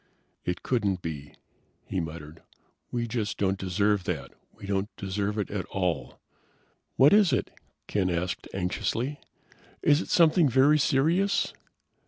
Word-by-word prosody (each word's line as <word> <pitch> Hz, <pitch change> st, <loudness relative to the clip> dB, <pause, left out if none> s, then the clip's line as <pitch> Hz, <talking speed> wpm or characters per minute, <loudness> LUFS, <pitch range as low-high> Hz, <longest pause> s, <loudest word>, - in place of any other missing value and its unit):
"It 90 Hz, 0 st, -3 dB
couldn't 100 Hz, -7 st, 0 dB
be," 75 Hz, -3 st, -6 dB, 0.5 s
he 95 Hz, -, -2 dB
muttered. 80 Hz, -1 st, -7 dB, 0.5 s
"We 120 Hz, -1 st, -2 dB
just 110 Hz, -2 st, -2 dB
don't 95 Hz, -1 st, 0 dB
deserve 100 Hz, +1 st, +1 dB
that. -, -, -4 dB, 0.2 s
We -, -, -12 dB
don't 100 Hz, +1 st, -1 dB
deserve 100 Hz, +2 st, -2 dB
it 105 Hz, -, -2 dB
at 100 Hz, -2 st, -3 dB
all." 90 Hz, -3 st, -2 dB, 0.8 s
"What 135 Hz, +6 st, +6 dB
is 205 Hz, -5 st, +5 dB
it?" 130 Hz, -, 0 dB, 0.3 s
Ken 95 Hz, -3 st, 0 dB
asked 90 Hz, +1 st, -2 dB
anxiously. 115 Hz, +9 st, -2 dB, 0.6 s
"Is 145 Hz, +2 st, +4 dB
it -, -, -7 dB
something 165 Hz, -2 st, +5 dB
very 140 Hz, +5 st, +5 dB
serious?" 165 Hz, +9 st, +2 dB
105 Hz, 135 wpm, -27 LUFS, 90-135 Hz, 0.8 s, What